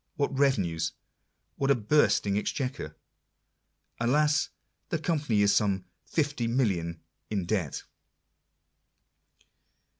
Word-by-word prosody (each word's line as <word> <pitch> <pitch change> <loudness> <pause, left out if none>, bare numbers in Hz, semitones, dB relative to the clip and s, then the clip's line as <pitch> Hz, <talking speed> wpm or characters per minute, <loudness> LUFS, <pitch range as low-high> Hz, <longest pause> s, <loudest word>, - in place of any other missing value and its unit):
what 140 -1 -1
revenues! 100 - +1 0.6
what 135 - 0
a 140 - +6
bursting 110 -4 +3
exchequer! 125 - -2 1.0
Alas! 150 +5 +2 0.4
the 165 - 0
Company 150 -10 +1
is 100 - +4
some 95 -3 +1 0.3
50,000,000/. 115 - 0 0.3
in 100 -4 -1
debt. 90 -6 -1
115 Hz, 85 wpm, -28 LUFS, 100-140 Hz, 1.0 s, a